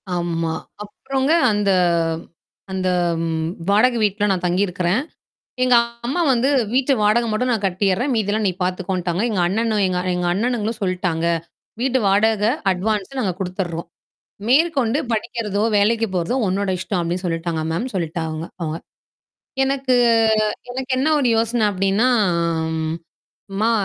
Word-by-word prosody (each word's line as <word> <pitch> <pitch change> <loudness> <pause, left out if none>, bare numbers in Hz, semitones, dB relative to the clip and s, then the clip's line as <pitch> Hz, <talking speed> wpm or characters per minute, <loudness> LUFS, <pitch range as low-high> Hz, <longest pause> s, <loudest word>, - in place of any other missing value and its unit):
ஆமா. 165 -2 -1 0.3
அப்புறங்க 265 +7 -2 0.2
"அந்த, 205 -1 +1 1.0
அந்த 185 -1 -1 0.4
ம் 160 0 -1 0.2
வாடகை 235 +4 +4
வீட்ல 205 0 +1
நான் 180 -1 -1
தங்கி 180 +3 +2
இருக்கிறேன். 180 +5 0 0.6
எங்க 250 -1 +5 0.3
அம்மா 310 +8 -1
வந்து 250 +2 +2 0.3
வீட்டு 270 +1 +3
வாடகை 225 +3 +3
மட்டும் 250 +4 0
நான் 215 -3 -1
கட்டிர்றேன். 195 +8 0
மீதி 205 -2 0
எல்லாம் 215 0 0
நீ - - 0
பாத்துக்கோன்ட்டாங்க." 180 0 -2
"எங்க 200 - 0
அண்ணனும் 215 +2 0
எங்க, 180 -1 -1 0.2
எங்க 180 0 -1
அண்ணனுங்களும் 225 +2 -1
சொல்லிட்டாங்க. 180 -3 -1 0.6
வீட்டு 260 0 +2
வாடகை, 210 +2 +3 0.2
அட்வான்ஸ் 210 +6 -2
நாங்க 195 -6 0
குடுத்துர்றோம். 180 -2 -4 0.6
மேற்கொண்டு 275 -2 +3
படிக்கிறதோ! 215 -2 -2 0.2
வேலைக்கு 225 +3 +2
போறதோ 175 +7 -1
உன்னோட 195 +1 -1
இஷ்டம் 185 +1 -2
அப்பிடின்னு 175 +2 -3
சொல்லிட்டாங்க 165 -1 -2
மேம்." 180 +11 -2
சொல்லிட்டா 165 -1 -2
அவ 155 - -4 0.3
அவுங்க. 160 -1 -2 0.9
எனக்கு, 270 -1 +1 0.8
எனக்கு 260 +1 -5
என்ன 275 - +2
ஒரு 265 -4 +2
யோசனை 230 0 +1
அப்பிடின்னா, 195 +4 +1 1.5
"அம்மா! 215 +4 +1
205 Hz, 130 wpm, -21 LUFS, 180-235 Hz, 1.5 s, எங்க